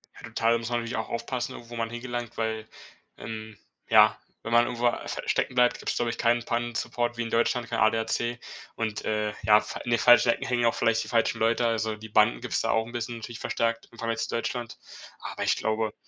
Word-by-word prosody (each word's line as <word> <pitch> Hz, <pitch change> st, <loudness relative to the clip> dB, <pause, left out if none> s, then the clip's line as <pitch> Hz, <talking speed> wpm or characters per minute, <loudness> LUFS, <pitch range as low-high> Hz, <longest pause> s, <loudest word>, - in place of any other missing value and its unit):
Ja, -, -, -14 dB
total, 115 Hz, 0 st, +1 dB
da -, -, +3 dB
muss 115 Hz, 0 st, -5 dB
man 120 Hz, 0 st, 0 dB
natürlich 115 Hz, +1 st, -4 dB
auch 110 Hz, -, -3 dB
aufpassen, 120 Hz, +1 st, -3 dB
wo 120 Hz, -, -8 dB
man 115 Hz, -1 st, -2 dB
hingelangt, 120 Hz, 0 st, -5 dB
weil, 110 Hz, -1 st, -2 dB, 0.5 s
ähm, 110 Hz, -1 st, -7 dB, 0.3 s
ja, -, -, +6 dB, 0.3 s
wenn 115 Hz, -, -5 dB
man 120 Hz, 0 st, +5 dB
irgendwo 120 Hz, 0 st, 0 dB
s 120 Hz, -, -2 dB
stecken -, -, 0 dB
bleibt, 125 Hz, 0 st, +3 dB
gibt's -, -, -2 dB
glaube 120 Hz, -, 0 dB
ich 115 Hz, -, -4 dB
keinen 120 Hz, 0 st, +2 dB
Pannensupport 120 Hz, 0 st, -2 dB
wie -, -, -1 dB
in 115 Hz, -, -3 dB
Deutschland, 115 Hz, 0 st, +1 dB
kein -, -, -1 dB
ADAC 115 Hz, +2 st, +1 dB, 0.4 s
und, 110 Hz, -2 st, -3 dB
äh, 105 Hz, -1 st, -1 dB
ja, 105 Hz, 0 st, +6 dB
fa -, -, -7 dB
in 120 Hz, -, -4 dB
den 115 Hz, -, +3 dB
falschen 120 Hz, -1 st, +6 dB
Ecken 125 Hz, +3 st, +1 dB
hängen 120 Hz, -2 st, +1 dB
auch 115 Hz, -, +3 dB
vielleicht 115 Hz, 0 st, +2 dB
die -, -, -10 dB
falschen 115 Hz, -2 st, +1 dB
Leute. 115 Hz, +1 st, +2 dB
Also 110 Hz, -1 st, 0 dB
die 110 Hz, +1 st, -11 dB
Banden 110 Hz, +3 st, +3 dB
gibt's 125 Hz, -, -1 dB
da 115 Hz, -, 0 dB
auch 110 Hz, 0 st, +1 dB
'n 115 Hz, -, -10 dB
bisschen, 120 Hz, 0 st, -4 dB
natürlich 115 Hz, +1 st, -8 dB
verstärkt 115 Hz, 0 st, -1 dB
im 115 Hz, -, -16 dB
Vergleich 115 Hz, -1 st, -2 dB
zu 115 Hz, -, -2 dB
Deutschland. 120 Hz, 0 st, -3 dB, 0.4 s
Aber -, -, -5 dB
ich -, -, +3 dB
glaube, 110 Hz, -1 st, -1 dB
115 Hz, 230 wpm, -27 LUFS, 110-120 Hz, 0.5 s, ja